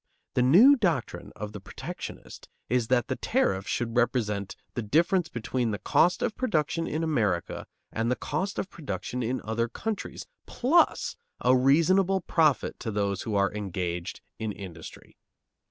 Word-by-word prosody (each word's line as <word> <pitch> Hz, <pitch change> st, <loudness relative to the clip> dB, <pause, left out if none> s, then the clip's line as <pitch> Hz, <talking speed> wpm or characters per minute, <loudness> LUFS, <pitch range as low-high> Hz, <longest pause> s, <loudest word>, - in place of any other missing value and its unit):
The -, -, +2 dB
new 195 Hz, -, +8 dB
doctrine 175 Hz, -, -1 dB
of 105 Hz, -1 st, -6 dB
the 105 Hz, -, -7 dB
protectionist 95 Hz, -, -8 dB, 0.2 s
is 120 Hz, -1 st, +1 dB
that 125 Hz, 0 st, +2 dB
the -, -, -2 dB
tariff 95 Hz, +1 st, 0 dB
should 115 Hz, -1 st, -2 dB
represent 105 Hz, -5 st, 0 dB, 0.2 s
the 120 Hz, -, -2 dB
difference 165 Hz, -, +2 dB
between 120 Hz, +1 st, -2 dB
the 105 Hz, -, -2 dB
cost 180 Hz, -, +2 dB
of 225 Hz, -, -1 dB
production 165 Hz, -, 0 dB
in 155 Hz, +2 st, -2 dB
America 105 Hz, -, -1 dB, 0.2 s
and 115 Hz, +1 st, -1 dB
the 125 Hz, -, +2 dB
cost 195 Hz, +8 st, -3 dB
of -, -, -2 dB
production 125 Hz, -, -4 dB
in 125 Hz, +2 st, -1 dB
other 115 Hz, +2 st, -1 dB
countries, 220 Hz, -, -5 dB, 0.2 s
plus 310 Hz, +8 st, +2 dB, 0.3 s
a 130 Hz, -, +5 dB
reasonable 175 Hz, +9 st, +4 dB
profit 155 Hz, -7 st, +1 dB
to -, -, -4 dB
those 100 Hz, -2 st, -1 dB
who 110 Hz, -3 st, -3 dB
are 100 Hz, 0 st, +2 dB
engaged 90 Hz, -2 st, -4 dB, 0.2 s
in 110 Hz, -1 st, -2 dB
industry. 90 Hz, -5 st, -10 dB
120 Hz, 155 wpm, -27 LUFS, 105-165 Hz, 0.3 s, new